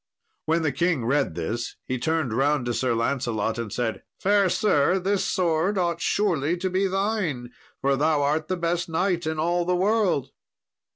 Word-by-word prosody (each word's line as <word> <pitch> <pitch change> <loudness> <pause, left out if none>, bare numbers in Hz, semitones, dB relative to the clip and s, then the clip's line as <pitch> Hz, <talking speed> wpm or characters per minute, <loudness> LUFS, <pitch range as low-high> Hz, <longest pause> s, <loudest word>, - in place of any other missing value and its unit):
When 165 +1 +2
the 155 - +1
king 155 -3 0
read 135 - +1
this, 110 +8 -3
he 130 -1 -3
turned 160 -4 0
round 140 +1 +1
to 120 - -1
Sir 125 -1 0
Lancelot, 115 -2 -1
and 115 -3 -4
said, 115 0 -2 0.2
"Fair 200 -1 +3
sir, 180 -3 +2
this 195 +1 0
sword 180 +2 +1
ought 170 -2 0
surely 175 -5 +1
to 185 +1 -2
be 190 +2 +1
thine, 190 - -1 0.3
for 140 0 +2
thou 150 +1 +2
art 155 +2 0
the 185 - -1
best 170 0 -1
knight 175 0 0
in 160 0 -2
all 175 +3 +1
the 180 +1 0
world." 190 - +1
160 Hz, 175 wpm, -25 LUFS, 135-180 Hz, 0.3 s, Fair